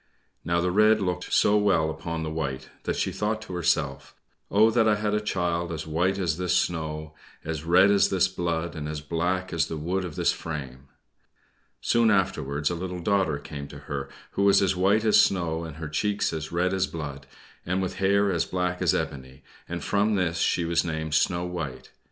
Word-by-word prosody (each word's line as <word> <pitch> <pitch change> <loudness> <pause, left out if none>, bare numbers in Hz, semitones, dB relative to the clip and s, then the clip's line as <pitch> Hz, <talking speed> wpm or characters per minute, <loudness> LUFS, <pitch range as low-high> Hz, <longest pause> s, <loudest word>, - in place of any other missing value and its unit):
Now 85 0 +1
the 90 +1 0
red 105 +3 +5
looked 90 -2 -2
so 105 - +4
well 90 -7 +2
upon 85 0 -4
the 80 - -3
white 70 -5 -4 0.2
that - - -1
she - - -1
thought 105 +1 -1
to 100 - -9
herself, 90 -2 -1 0.3
"Oh, 110 +3 +5
that 115 -1 +3
I 105 - +4
had 105 0 -1
a 105 - +1
child 85 -4 -1
as 80 - -4
white 90 +5 0
as 85 -3 -1
this 90 0 +2
snow, 80 -2 -2 0.3
as 80 -1 -4
red 90 +4 +5
as 100 -1 +4
this 95 -1 +3
blood, 85 -2 -2
and 75 -1 -4
as 75 0 -4
black 90 +4 -2
as 80 -3 +1
the 80 - -5
wood 90 +5 -1
of 85 -4 -6
this - - +2
frame!" 70 -4 -7 0.9
Soon 115 -1 +3
afterwards 80 -7 0
a - - -2
little 90 +1 -5
daughter 90 -4 +1
came 70 -1 -8
to - - -10
her, 70 -1 -5 0.2
who - - -2
was 100 0 +6
as 95 -1 +2
white 100 +4 +2
as 110 - +6
snow, 85 -3 0
and 80 -2 -8
with 75 -2 -6
cheeks 105 +3 0
as 80 -1 -5
red 90 +2 +1
as 95 0 +1
blood, 70 -5 -7 0.4
and 95 +2 -1
with 95 -1 -3
hair 100 +1 +3
as 85 -3 +1
black 90 0 -2
as 90 - +3
ebony, 65 -3 -5 0.3
and 85 0 -4
from 105 +1 +1
this 85 -3 0
she 85 - +1
was 85 0 +1
named 80 -2 -3
"Snow 85 +2 +2
White." 80 -8 -6
85 Hz, 205 wpm, -26 LUFS, 80-95 Hz, 0.9 s, was